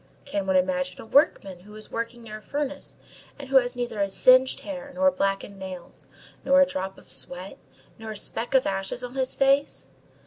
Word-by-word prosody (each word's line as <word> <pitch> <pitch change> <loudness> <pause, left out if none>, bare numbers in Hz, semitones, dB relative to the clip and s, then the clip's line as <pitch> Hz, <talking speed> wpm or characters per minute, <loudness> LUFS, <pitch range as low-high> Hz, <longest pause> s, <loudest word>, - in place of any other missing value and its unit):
Can 200 -9 -3
one 190 - +2
imagine 180 0 0
a - - -9
workman 200 - +2
who 210 +4 -15
is 215 - -7
working 230 +1 -5
near 215 -1 -8
a - - -21
furnace, 285 +3 -5 0.4
and 280 -2 -9
who 270 - +5
has 245 -1 +2
neither 240 -4 -3
a 200 - +1
singed 255 +5 +5
hair, 280 -1 -7
nor 280 0 +4
blackened 195 -5 -2
nails, 185 -2 -9 0.4
nor 275 0 +5
a 275 - +7
drop 190 -7 -5
of - - -16
sweat, 180 +2 -1 0.4
nor 225 0 -8
a 215 - -6
speck 235 +5 0
of 260 - +4
ashes 195 +5 -2
on 245 0 -6
his 260 -1 -1
face? 275 +1 +1
230 Hz, 200 wpm, -25 LUFS, 195-270 Hz, 0.4 s, a